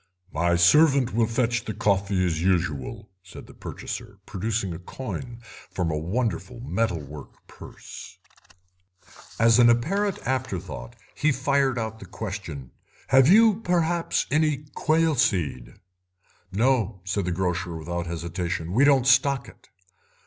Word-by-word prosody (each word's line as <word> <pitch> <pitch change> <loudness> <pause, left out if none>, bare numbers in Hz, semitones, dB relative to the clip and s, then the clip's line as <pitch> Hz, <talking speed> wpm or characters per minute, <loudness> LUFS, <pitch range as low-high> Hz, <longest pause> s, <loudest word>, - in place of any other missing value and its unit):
"My 85 +2 +2
servant 135 - +4
will 115 0 +2
fetch 115 0 0
the 110 - -4
coffee 100 -2 +1
as 80 -3 -1
usual," 85 -5 -1
said 95 +2 -12
the - - -15
purchaser, 105 -4 -7
producing 100 -1 -2
a 80 - -7
coin 120 +4 -7 0.3
from 90 -3 -2
a 75 - -1
wonderful 115 +7 -3
metal 115 -7 -1
work 75 0 -12
purse. - - -12 1.2
As 115 +1 +5
an 120 -1 +7
apparent 190 - +1
afterthought 95 - -4 0.2
he 155 - +1
fired 135 -1 +1
out 110 -1 -4
the - - -11
question: 90 - -6 0.4
"Have 135 -1 +6
you, 215 +3 +6
perhaps, 175 -2 0
any 150 -1 +1
quail 160 +1 +2
seed?" 80 - 0 0.8
"No," 110 -2 +1
said 95 0 -1
the 90 - -1
grocer, 90 0 -2
without 85 +2 -4
hesitation, 85 0 -4
"we 125 +7 +4
don't 140 -3 +4
stock 135 0 +3
it." - - -17
110 Hz, 135 wpm, -25 LUFS, 90-135 Hz, 1.2 s, an